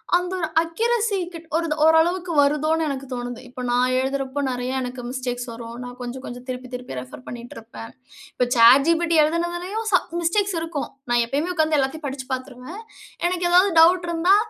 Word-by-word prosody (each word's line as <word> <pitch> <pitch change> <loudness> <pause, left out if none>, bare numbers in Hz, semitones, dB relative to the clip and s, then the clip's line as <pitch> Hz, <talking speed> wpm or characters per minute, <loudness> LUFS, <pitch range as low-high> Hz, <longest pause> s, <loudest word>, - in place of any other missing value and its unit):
அந்த 360 +1 0
ஒரு 320 - -1
accuracy 440 +5 0 0.2
kit 335 0 -9
ஒருத 330 -2 -1
ஓரளவுக்கு 340 +3 +3
வருதோன்னு 305 +3 +2
எனக்கு 275 -1 -4
தோணுது. 245 -1 -5
இப்ப 255 0 -8
நான் 250 +1 +2
எழுதுறப்போ 270 +1 -2
நிறைய 250 0 -3
எனக்கு 250 0 -5
மிஸ்டேக்ஸ் 250 -1 -4
வரும். 230 0 -8
நான் 245 0 -8
கொஞ்சம் 245 +2 -6
கொஞ்சம் 245 +1 -8
திருப்பி 255 0 -5
திருப்பி 250 - -6
ரெஃபர் 125 0 -10
பண்ணிட்ருப்பேன். 225 - -9 0.4
இப்ப 250 - +1
சாட் 245 +4 +7
ஜிபிட் 335 0 +2
எழுதுனதுலயும் 345 +7 -1
ச 370 - +6 0.2
மிஸ்டேக்ஸ் 390 +3 +1
இருக்கும். 325 -3 -4 0.2
நான் 240 0 +4
எப்பயுமே 290 +9 -1
உக்கார்ந்து 315 -2 +2
எல்லாத்தையும் 285 +3 -1
படிச்சு 265 -1 -6
பாத்துருவேன். 260 - -7 0.5
எனக்கு 355 0 0
ஏதாவது 365 +3 +5
டவுட் 350 +2 +6
இருந்தா, 340 +3 +4
285 Hz, 165 wpm, -23 LUFS, 250-340 Hz, 0.5 s, சாட்